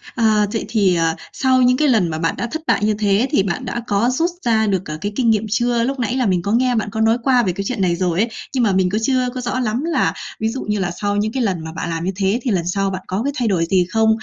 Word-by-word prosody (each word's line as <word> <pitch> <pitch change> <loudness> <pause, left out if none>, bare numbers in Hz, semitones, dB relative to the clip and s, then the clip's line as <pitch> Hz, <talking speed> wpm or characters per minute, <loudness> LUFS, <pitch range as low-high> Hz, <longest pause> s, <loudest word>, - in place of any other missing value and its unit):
À, 220 -3 +3
vậy 225 - -2
thì, 200 -5 +2
à, 165 -1 +1 0.2
sau 260 -1 +2
những 250 +1 +4
cái 305 - +2
lần 220 -9 +3
mà 155 - -3
bạn 165 0 0
đã 240 - -2
thất 315 - -4
bại - - +2
như 215 - +2
thế, 210 +4 +2
thì 195 - +3
bạn 175 -3 -3
đã 235 - -3
có 205 +4 +2
rút 330 +7 0
ra 220 -2 +2
được, 190 -2 0
à, 155 - -4
cái 205 +1 -2
kinh 245 -3 +2
nghiệm 220 -1 +2
chưa? 240 +1 +1
Lúc 270 +1 -2
nãy 245 +1 -1
là 255 - +1
mình 185 -4 +1
có 200 - -3
nghe 250 +2 +2
bạn 215 -2 -1
có 220 - -2
nói 225 +2 +3
qua 250 -2 +3
về 185 -3 0
cái 200 - -4
chuyện 240 -6 -2
này 175 -2 +2
rồi 175 -1 -1
ấy. 230 +3 +2 0.2
Nhưng 255 - +1
mà 210 - +3
mình 185 -1 +2
cứ 210 - -1
chưa 255 +1 +1
có 255 - -3
rõ 250 +1 -2
lắm 245 +3 -1
là, 325 -5 +1 0.3
ví 220 +1 0
dụ 260 +3 -4
như 210 -1 -1
là 180 -2 -1
sau 205 +3 -2
những 210 +1 0
cái 260 -1 -1
lần 185 -6 -1
mà 160 - -6
bạn 165 +1 -5
làm 165 0 -3
như 190 - 0
thế 200 +4 0
thì 245 - 0
lần 175 -3 0
sau 195 +1 0
bạn 185 -1 -4
có 195 +5 -2
cái 285 - -1
thay 240 -4 0
đổi 175 -5 +1
gì 180 0 +2
không? 220 +3 +2
215 Hz, 315 wpm, -19 LUFS, 190-245 Hz, 0.3 s, những